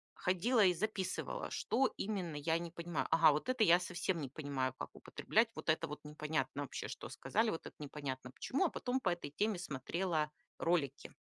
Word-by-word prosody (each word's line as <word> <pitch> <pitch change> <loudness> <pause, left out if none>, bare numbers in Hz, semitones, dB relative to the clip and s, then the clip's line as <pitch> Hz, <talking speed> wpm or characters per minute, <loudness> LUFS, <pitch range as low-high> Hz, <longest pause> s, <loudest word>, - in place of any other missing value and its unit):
ходила 205 +6 +3
и 180 - +5
записывала, 195 +1 -2
что 265 - +1
именно 190 -7 -2
я 160 +3 +1
не 170 -1 -5
понимаю. 170 -2 -2
Ага, 160 -2 +7
вот 155 - -2
это 255 -3 +3
я 175 0 +7
совсем 175 -1 -1
не 135 - -4
понимаю, 135 -2 -2
как - - -4
употреблять. 225 +1 +1
Вот - - -5
это 155 - +2
вот 150 - -6
непонятно 150 -2 -2
вообще, 135 - -5
что - - -6
сказали. 225 +1 +1
Вот 165 - -5
это - - -9
непонятно 135 -3 -5
почему. 275 - 0
А - - +3
потом 255 -1 -1
по - - +2
этой 170 -5 -3
теме 210 -3 +1
смотрела 155 +1 -1 0.3
ролики. 150 -6 0
170 Hz, 185 wpm, -36 LUFS, 150-195 Hz, 0.3 s, Ага